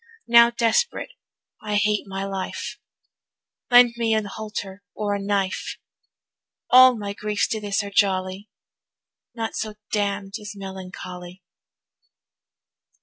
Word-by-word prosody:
Now 235 0 +7
desperate 235 - 0 0.5
I 210 -1 -2
hate 210 0 +1
my 195 0 -4
life, 195 -1 -5 0.9
Lend 245 -1 +7
me 225 -1 +1
a 215 -1 -1
halter 205 -2 -6
or 210 -1 -1
a 200 - -2
knife; 195 -1 -2 0.9
All 255 -1 +8
my 200 -1 -4
griefs 210 0 -1
to 220 - -2
this 205 0 -1
are 200 - -7
jolly, 190 0 0 0.9
Naught 225 -2 -4
so 215 -1 -4 0.2
damn'd 200 -1 -1
as 210 0 -7
melancholy. 185 -2 -9
205 Hz, 115 wpm, -23 LUFS, 195-220 Hz, 0.9 s, All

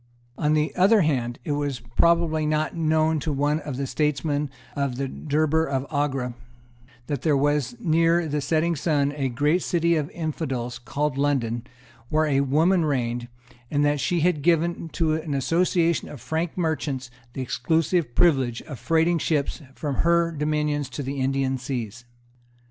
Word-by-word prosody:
On 150 +2 +1
the 150 0 0
other 200 +4 +5
hand, 125 -7 0
it 150 - -3
was 145 -3 -1 0.2
probably 170 -2 +3
not 155 0 0
known 160 -1 +2
to 155 - -2
one 145 +2 +1
of 145 -4 -6
the 140 - -2
statesmen 145 +1 0 0.3
in 140 -1 0
the 135 +2 -2
Durbar 155 +3 0
of 135 -1 -1
Agra 135 -4 -1 0.7
that 140 -1 -3
there 150 -2 +2
was 145 - +1
near 165 -3 +2
the 150 0 -1
setting 160 +4 +1
sun 145 -1 +1
a 135 -3 -1
great 150 +8 +1
city 170 -1 +1
of 150 -1 -1
infidels, 135 -7 -4
called 140 +3 -2
London, 125 -4 0 0.4
where 155 +1 +2
a 140 -2 +2
woman 160 +6 +3
reigned, 120 -5 -1 0.4
and 145 0 +2
that 145 0 +2
she 175 +4 0
had 170 -3 +2
given 170 +1 +1
to 160 -1 0
an 155 -2 -2
association 165 +4 +1
of 145 - -9
Frank 160 +8 -3
merchants 145 -6 -2 0.2
the 130 - -3
exclusive 160 -1 0
privilege 135 -8 +2
of 135 -6 -8
freighting 165 +1 +2
ships 150 +1 -1
from 145 -4 -3
her 170 0 +3
dominions 150 -2 -1
to 140 +2 -5
the 135 +1 -4
Indian 135 0 0
seas. 125 -3 -5
150 Hz, 160 wpm, -24 LUFS, 135-160 Hz, 0.7 s, other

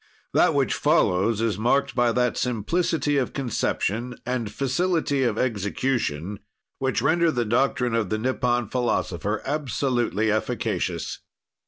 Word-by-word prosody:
That - - +4
which - - +2
follows 100 +5 +2
is 110 -4 0
marked 135 +5 +2
by 120 -1 +2
that 125 0 +1
simplicity 145 - 0
of 130 - -1
conception 120 -2 -1
and 120 -4 -2
facility 145 - 0
of 120 -4 +1
execution 105 - -1 0.4
which 130 -1 0
render 170 +2 +3
the 120 -6 0
doctrine 125 +1 +1
of 115 -4 0
the 110 - 0
Nippon 120 0 0
philosopher 105 -4 -1
absolutely 125 -6 0
efficacious. 110 0 -2
120 Hz, 125 wpm, -24 LUFS, 110-135 Hz, 0.4 s, That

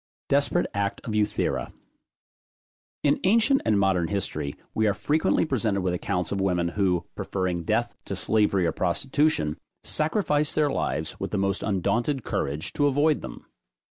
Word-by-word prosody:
DESPERATE 145 +5 +2
ACT 100 0 -1
OF 110 - -4
EUTHIRA. 105 -1 0 1.3
In 145 0 +3
ancient 230 +7 +4
and 105 -2 +3
modern 95 -4 +2
history, 90 -7 -2 0.2
we 110 0 +2
are 100 - +1
frequently 155 +7 +1
presented 110 -9 0
with 90 -1 0
accounts 90 -1 -2
of 100 - -1
women, 90 -3 +1
who, 90 -2 0
preferring 90 -2 -2
death 110 +8 0
to - - -4
slavery 105 -4 +2
or 85 - +2
prostitution, 110 - 0 0.2
sacrificed 150 -2 +1
their 150 -2 +2
lives - - -2
with - - -3
the - - -2
most 100 0 0
undaunted 115 - 0
courage 75 +3 -2
to 145 - +2
avoid 145 +2 +2
them. - - -9
105 Hz, 150 wpm, -26 LUFS, 90-145 Hz, 1.3 s, ancient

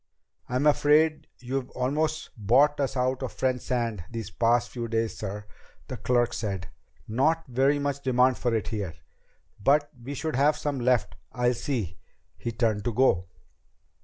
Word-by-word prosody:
"I'm 125 +3 0
afraid 150 +1 +4
you've 130 +1 -3
almost 155 +5 -1
bought 130 +8 +3
us 135 -1 -1
out 130 +1 0
of 130 - -4
French 130 -1 0
sand 115 -6 -2
these 115 -3 -6
past 115 +6 +2
few 120 -2 -4
days, 115 0 -1
sir," 105 0 -5 0.4
the - - -4
clerk 120 -1 +1
said. 95 -4 -3 0.4
"Not 155 +8 +1
very 135 +3 +2
much 140 -1 -2
demand 130 -1 +3
for 120 - 0
it 110 - -2
here. 100 -8 -4 0.7
But 145 +4 +3
we 140 +4 -6
should 155 -1 -3
have 145 +3 +4
some 145 -3 -2
left. 120 - +1 0.2
I'll 125 0 +2
see." 115 - -3 0.4
He 120 - -4
turned 110 -3 0
to 120 - 0
go. 95 -9 +3
125 Hz, 160 wpm, -27 LUFS, 115-140 Hz, 0.7 s, afraid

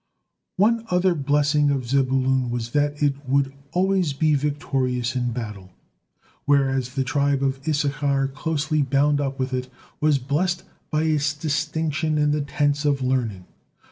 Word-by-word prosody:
One 225 +4 +3
other 180 0 +3
blessing 145 0 +2
of 135 -4 -1
Zebulun 130 -1 +1
was 120 -1 -3
that 145 +1 0
it 140 0 0
would 135 0 +2 0.2
always 185 -3 +1
be 155 +2 +2
victorious 135 -4 -1
in 125 -1 0
battle, 105 -6 -7 0.7
whereas 135 -2 +1
the 135 - +1
tribe 140 +1 +1
of 135 0 0
Issachar, 140 -2 +1
closely 150 +1 -1
bound 145 +2 +2
up 135 -1 -2
with 130 0 -2
it, 125 0 -2 0.3
was 150 -2 +3
blessed 170 +7 -1 0.3
by 155 0 0
its 155 -2 +1
distinction 155 0 -1
in 150 0 +2
the 150 0 0
"tents 145 +1 0
of 140 -3 +1
learning." 115 -8 -1
140 Hz, 145 wpm, -23 LUFS, 130-150 Hz, 0.7 s, One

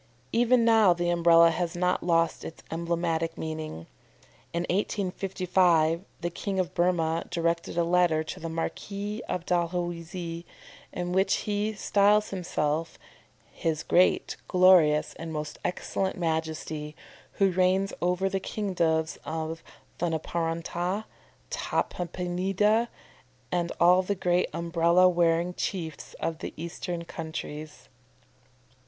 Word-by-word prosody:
Even 240 0 +4
now 220 -5 +6
the 175 0 -1
Umbrella 170 -1 +6
has 175 +1 -2
not 180 +1 +1
lost 165 -1 +1
its 160 - -9
emblematic 165 0 -1
meaning. 155 - -5 0.7
In 170 0 -1
1855 180 -3 +1 0.2
the 175 0 -2
King 195 +2 -3
of 185 - -1
Burmah 170 -2 +1
directed 170 -1 -1
a 170 - +3
letter 170 -2 +3
to 170 +3 -7
the 165 -1 -5
Marquis 200 +6 -4
of 175 -1 -2
Dalhousie 175 -1 -2 0.5
in 175 0 -3
which 190 +2 +2
he 210 +1 -1
styles 210 0 +3
himself 165 -4 -2 0.5
"His 160 -2 -2
great, 180 - +3
glorious, 180 -5 +5
and 165 0 -5
most 150 -1 -5
excellent 190 +1 -2
Majesty, 160 -2 -3 0.4
who 195 -1 +2
reigns 185 +2 +2
over 180 +2 +1
the 195 0 -1
kingdoms 170 -6 -1
of 160 0 -4 0.4
Thunaparanta, 170 +4 -2 0.5
Tampadipa, 185 +5 0 0.6
and 175 -1 0
all 180 +2 +6
the 200 +2 -2
great 180 -1 +1
Umbrella 170 +1 +3
wearing 170 0 +2
chiefs 165 -5 -4
of 165 -1 -3
the - - -6
Eastern 170 +1 -5
countries," 155 -2 -7
&c. 125 0 -32
175 Hz, 115 wpm, -27 LUFS, 165-185 Hz, 0.7 s, now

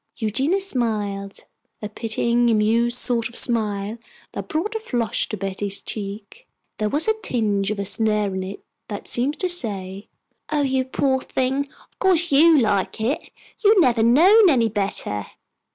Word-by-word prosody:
Eugenia 265 - 0
smiled, 210 - -3 0.4
a 210 - -5
pitying, 235 +2 0
amused 230 +2 +2
sort 240 -1 0
of 235 - -15
smile 215 -2 0 0.3
that - - -6
brought 335 +8 -2
a 445 - -2
flush 240 - -2
to 215 - -4
Betty's 195 +1 -3
cheek. 210 - -7 0.3
There 215 -1 0
was 300 - +1
a 440 - +4
tinge 205 - 0
of 215 - -2
a 200 - -3
sneer 210 -1 +1
in 190 - -3
it 190 +2 -8 0.2
that 205 -2 -7
seemed 270 +5 +1
to 370 - -1
say, 200 - -2 0.4
"Oh, 295 -1 +1
you 265 -1 0
poor 265 0 0
thing, 270 +2 -1 0.2
of - - -38
course 350 -3 +2
you 315 +3 +6
like 210 -5 0
it. 235 +7 -2 0.3
You 415 +1 +6
have 385 - +5 0.2
never - - +3
known 355 - +6
any 235 -7 +2
better." 195 - -2
230 Hz, 165 wpm, -22 LUFS, 205-280 Hz, 0.4 s, you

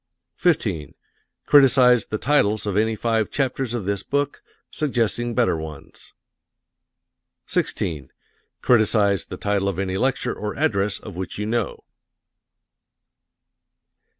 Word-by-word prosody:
15. 105 - 0 0.5
Criticise 130 -4 +5
the 110 - -3
titles 110 -5 +1
of 100 -2 -2
any 110 +2 +1
five 110 0 0
chapters 130 -3 -1
of 110 -6 -4
this 100 -1 -1
book, 145 0 -2 0.3
suggesting 120 -4 -1
better 120 -8 +2
ones. 80 -3 -9 1.3
16. 75 -6 -2 0.5
Criticise 105 -5 +3
the - - -7
title 100 -1 0
of 95 - -4
any 95 -1 -2
lecture 130 +1 0
or 105 0 -5
address 105 -9 +1
of 105 -5 -10
which 95 0 -5
you 105 - -3
know. 115 -1 -2
110 Hz, 115 wpm, -22 LUFS, 100-125 Hz, 1.3 s, Criticise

